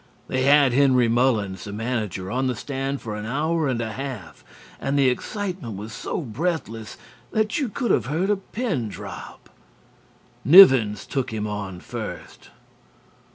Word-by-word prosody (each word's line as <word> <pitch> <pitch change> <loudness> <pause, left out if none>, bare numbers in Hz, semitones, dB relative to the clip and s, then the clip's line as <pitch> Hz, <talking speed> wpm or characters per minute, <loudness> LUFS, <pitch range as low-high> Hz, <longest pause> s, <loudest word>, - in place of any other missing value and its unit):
They 130 0 0
had 140 -2 +5
Henry 130 -2 +4
Mullins, 115 -6 +1
the 100 - -6
manager, 105 -4 -3
on 130 +2 0
the 125 - -1
stand 135 +2 -4
for 110 -3 -4
an 105 +1 -5
hour 155 +5 0
and 125 -3 -1
a 110 -1 -3
half, 120 - -7 0.4
and 140 +1 -1
the 135 -2 +5
excitement 175 - -4
was 105 +2 -7
so - - -4
breathless 120 -4 -4 0.3
that 215 - 0
you 270 -5 -1
could 235 0 -1
have - - +1
heard 170 +8 0
a - - +3
pin 190 - -3
drop. - - -10 0.9
Nivens 130 - +7
took 135 -4 -2
him 110 -1 -3
on 100 -4 -5
first. - - -8
130 Hz, 155 wpm, -23 LUFS, 110-150 Hz, 0.9 s, Nivens